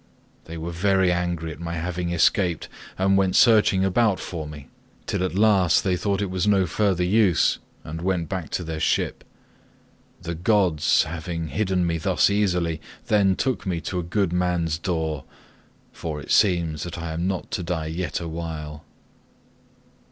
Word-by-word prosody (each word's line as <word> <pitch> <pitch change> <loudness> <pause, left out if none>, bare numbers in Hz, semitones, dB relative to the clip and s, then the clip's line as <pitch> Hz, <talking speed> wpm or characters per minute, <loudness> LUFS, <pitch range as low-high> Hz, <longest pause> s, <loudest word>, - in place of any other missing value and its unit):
They 85 - -8
were 80 +2 -5
very 95 +1 +2
angry 85 -2 -2
at 80 - -10
my 85 0 -4
having 85 +1 -3
escaped 85 0 +2 0.3
and 95 +1 +3
went 95 -1 +2
searching 105 -5 +5
about 100 +1 +2
for 80 -4 -5
me, 75 -2 -10 0.4
till - - -1
at 95 -1 -2
last 100 -5 +4
they 95 -2 +1
thought 100 +2 -1
it 95 - -4
was 95 +1 -1
no 100 -2 +4
further 95 +1 +1
use 95 -2 +3 0.2
and 80 +2 -6
went 90 -2 -1
back 90 -2 -4
to 90 - -3
their 80 -1 -4
ship. 80 - 0 1.0
The 85 0 -3
gods, 90 -3 +2
having 85 0 -5
hidden 95 +2 0
me 85 -1 -1
thus 95 +3 +2
easily, 90 -6 0 0.3
then 100 -3 +4
took 130 -5 -2
me 90 -3 -1
to 90 - -3
a - - -3
good 90 +1 0
man's 90 -3 0
door—for 80 -1 -6
it - - -7
seems 85 -7 +2
that 85 +1 -5
I 85 -1 -5
am 85 +3 -2
not 95 -2 -3
to - - -2
die 85 -2 -3
yet 80 -1 -3
awhile." 80 -3 -6
90 Hz, 165 wpm, -24 LUFS, 80-95 Hz, 1.0 s, searching